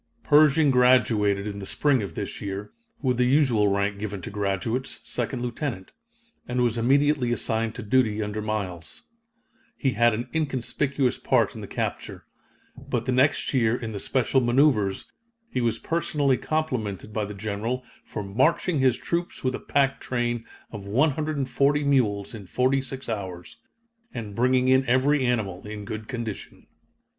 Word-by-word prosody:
Pershing 150 0 +5
graduated 115 -6 +3
in 100 -1 -5
the 100 - -6
spring 140 -5 +2
of 100 - -6
this - - -5
year, 100 +1 -5 0.3
with 125 -3 +1
the 125 - +3
usual 125 -6 +3
rank 100 0 0
given 100 -1 -4
to - - -6
graduates, 105 +5 -2
second 120 +1 -3
lieutenant, 120 -5 -4 0.6
and 125 0 0
was 120 -2 +1
immediately 135 +2 +2
assigned 115 -1 -1
to - - -6
duty 110 -1 +2
under 105 +1 -4
Miles. 95 -7 -4 0.7
He 135 - +1
had 120 -2 +3
an 120 +3 -4
inconspicuous 140 -2 0
part - - +2
in - - -8
the - - -7
capture. - - -4 0.5
But 120 -1 -3
the 130 - 0
next 130 +4 +2
year 120 -3 +3
in 115 -3 -5
the 100 - -5
special 130 +2 +1
maneuvers 120 -6 +2 0.5
he 125 - -1
was 115 -1 +1
personally 150 -3 0
complimented 115 - -3
by 110 -1 -1
the 105 0 -7
General 110 +5 -3 0.2
for 105 - -6
"marching 135 - +1
his 130 -2 +3
troops 170 +1 -3
with 130 0 0
a - - -4
pack 135 -1 +1
train 120 -2 -2 0.3
of 100 -3 -8
140 145 +2 +1
mules 115 -8 +1
in 105 -4 -9
46 130 +3 -1
hours 95 -1 -5 0.5
and 110 -4 -6
bringing 125 +3 +2
in 130 +1 +5
every 130 +3 +3
animal 110 -7 -1
in 105 -1 -7
good 110 +1 -6
condition." 115 -5 -6
120 Hz, 155 wpm, -25 LUFS, 105-135 Hz, 0.7 s, Pershing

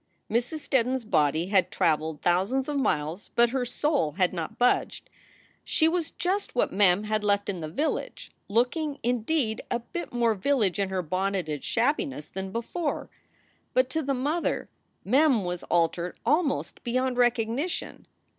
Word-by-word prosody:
Mrs. 245 +7 -1
Steddon 255 -1 +2
s 260 - -3
body 160 -3 +1
had 195 -2 +3
traveled 155 -1 0
thousands 195 +10 +2
of 290 -1 -1
miles, 160 - -1
but 235 0 +5
her 260 -1 0
soul 250 - 0
had 180 +1 +1
not 165 -3 -5
budged. 245 0 +1 0.5
She 320 - +3
was 330 -1 0
just 380 0 -2
what 245 - +1
Mem 195 0 +4
had 215 0 -1
left 205 0 +1
in 190 -3 -3
the 155 - -4
village, 295 - -3 0.2
looking, 275 +7 +1
indeed, 240 0 0
a - - +1
bit 290 +9 -6
more 235 -2 +2
village 210 -3 +1
in 195 -1 0
her 190 -1 -1
bonneted 185 -3 -2
shabbiness 255 - 0
than 190 0 -5
before. 285 - -3 0.6
But 255 0 +3
to 320 - 0
the 275 -2 -1
mother 295 +7 -1 0.4
Mem 255 -2 +4
was 175 0 -3
altered 170 +1 +1
almost 300 -1 0
beyond 255 +1 0
recognition. 245 +6 0
235 Hz, 155 wpm, -27 LUFS, 185-275 Hz, 0.6 s, but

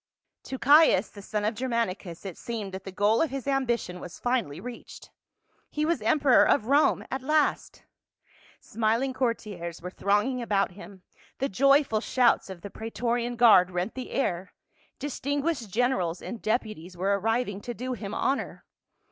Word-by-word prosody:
To 265 - -5
Caius, 285 - +5
the 205 - -12
son 210 +1 -3
of 215 - +1
Germanicus, 210 -7 -3
it 190 -4 -6
seemed 220 -5 -5
that 190 0 -8
the 195 - -6
goal 205 +4 +2
of 325 - +1
his 270 -2 -5
ambition 240 -9 -1
was 175 -1 -9
finally 245 - -1
reached. 245 -1 -10 0.6
He 300 0 -1
was 330 -6 0
emperor 265 +4 +4
of 220 - +2
Rome 285 +5 +3
at 265 - -2
last. 305 +3 0 0.8
Smiling 230 +4 -1
courtiers 205 -9 -3
were 180 +1 -7
thronging 210 +7 0
about 205 -5 0
him, 190 0 -13 0.3
the 270 - -1
joyful 275 0 +3
shouts 245 -4 +2
of 185 -2 -8
the 200 - -8
praeto 225 +2 -4
rian 240 0 -2
guard 215 -7 +6
rent 180 +3 -3
the 255 -1 -6
air, 185 -8 -2 0.4
distinguished 285 -2 -2
generals 190 -6 0
and 235 -3 -7
deputies 215 -6 -3
were 200 +2 +1
arriving 225 -1 -1
to 240 +2 -6
do 255 +3 -4
him 210 -3 -6
honor. 275 - -2
230 Hz, 160 wpm, -27 LUFS, 195-260 Hz, 0.8 s, guard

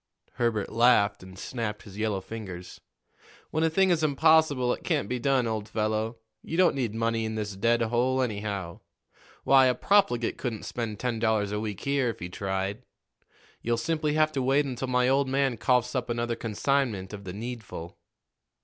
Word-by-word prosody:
Herbert 115 -4 -1
laughed 115 -4 +4
and 95 0 -12
snapped 105 -1 -4
his 100 -3 -12
yellow 105 -2 -1
fingers. 95 -4 -8 0.7
"When 155 - 0
a 160 - +4
thing 190 +3 +3
is 165 -2 +2
impossible, 150 -3 +4
it - - -8
can't 100 - 0
be 125 +2 -2
done, 135 -1 +2
old 110 -2 -3
fellow. 110 +1 -1 0.2
You 165 - -5
don't 180 -1 +5
need 120 -6 -2
money 115 0 0
in 110 0 -3
this 105 -2 -3
dead 115 +4 +2
hole, 125 +3 +1
anyhow. 100 -6 -4 0.6
Why, 135 -1 +6
a 125 - +2
profligate 195 - +2
couldn't 115 -5 -3
spend 110 -4 -4
ten 120 -3 -2
dollars 110 -3 +1
a 105 - -1
week 105 -2 -4
here, 140 -3 +1
if 115 - -4
he 90 - -5
tried. 95 +3 -3 0.8
You'll 120 0 0
simply 155 +4 0
have 155 0 +3
to 135 - -1
wait 135 +3 +3
until 130 -1 -4
my 125 0 +2
old 135 +1 +2
man 135 -2 +1
coughs 125 +3 +2
up 125 -2 -2
another 120 0 -1
consignment 115 -3 -1
of 100 -1 -7
the 90 -2 -6
needful." 110 -6 -7
115 Hz, 180 wpm, -27 LUFS, 105-130 Hz, 0.8 s, Why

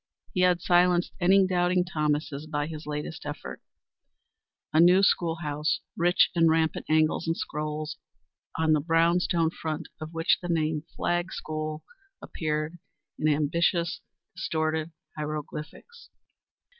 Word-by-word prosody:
He 180 - +1
had 180 -1 +3
silenced 175 0 +3
any 190 +2 +5
doubting 180 -1 +2
Thomases 150 -3 -2
by 145 -1 -1
his 155 -1 -8
latest 150 +2 -5
effort, 145 0 -7 1.1
a 155 - +4
new 180 +3 +6
school 170 -4 +2
house, 150 +1 -1
rich 175 +1 +3
in 165 -1 +4
rampant 160 0 +1
angles 155 +1 +2
and 165 - 0
scrolls, 150 0 -4 0.6
on 160 -1 +3
the 155 - +3
brown 165 +2 +3
stone 170 -3 +1
front 160 -1 -5
of 155 0 -7
which 165 +1 +2
the 175 - -5
name 155 -2 0
Flagg 175 +2 -1
School 155 0 -4 0.4
appeared 155 +1 -3 0.4
in 155 - +1
ambitious, 170 +3 +1 0.3
distorted 160 -3 -1 0.2
hieroglyphics. 150 - -7
160 Hz, 130 wpm, -27 LUFS, 155-175 Hz, 1.1 s, new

